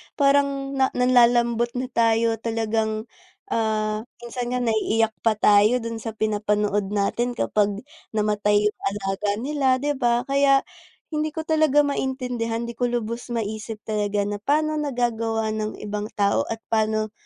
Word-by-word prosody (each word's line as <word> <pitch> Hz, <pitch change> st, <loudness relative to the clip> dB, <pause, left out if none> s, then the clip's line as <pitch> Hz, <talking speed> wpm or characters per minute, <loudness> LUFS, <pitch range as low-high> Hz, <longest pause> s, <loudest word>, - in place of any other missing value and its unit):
parang 275 Hz, -1 st, +2 dB, 0.2 s
nanlalambot 240 Hz, -1 st, +4 dB
na 255 Hz, 0 st, -3 dB
tayo 225 Hz, -1 st, +2 dB
talagang, 220 Hz, -1 st, -1 dB, 0.5 s
ah, 215 Hz, 0 st, -1 dB, 0.2 s
minsan 240 Hz, +1 st, -4 dB
nga -, -, 0 dB
naiiyak 225 Hz, 0 st, +1 dB
pa 225 Hz, -2 st, +2 dB
tayo 210 Hz, +4 st, +4 dB
dun 230 Hz, -1 st, -4 dB
sa 225 Hz, 0 st, -6 dB
pinapanood 210 Hz, -2 st, 0 dB
natin 240 Hz, +4 st, 0 dB
kapag 205 Hz, -1 st, 0 dB, 0.3 s
namatay 210 Hz, -1 st, +1 dB, 0.2 s
yung -, -, -51 dB
alaga 200 Hz, 0 st, -2 dB
nila 285 Hz, -1 st, -1 dB, 0.2 s
di 290 Hz, -, +1 dB
ba? 240 Hz, -3 st, +1 dB
Kaya 275 Hz, 0 st, +3 dB, 0.5 s
hindi 310 Hz, 0 st, -1 dB
ko 320 Hz, -, -3 dB
talaga 310 Hz, -2 st, +3 dB
maintindihan 250 Hz, -5 st, -2 dB
di 235 Hz, -, -4 dB
ko 245 Hz, +1 st, -1 dB
lubos 235 Hz, 0 st, -3 dB
maisip 215 Hz, 0 st, -4 dB
talaga 205 Hz, -1 st, -1 dB
na 205 Hz, 0 st, -3 dB
pano 305 Hz, +6 st, +1 dB
nagagawa 230 Hz, -5 st, -1 dB
ng 215 Hz, 0 st, -3 dB
ibang 210 Hz, 0 st, -3 dB
tao 200 Hz, -1 st, +1 dB
at 225 Hz, 0 st, -5 dB
pano 215 Hz, -1 st, +1 dB
225 Hz, 140 wpm, -23 LUFS, 215-250 Hz, 0.5 s, nanlalambot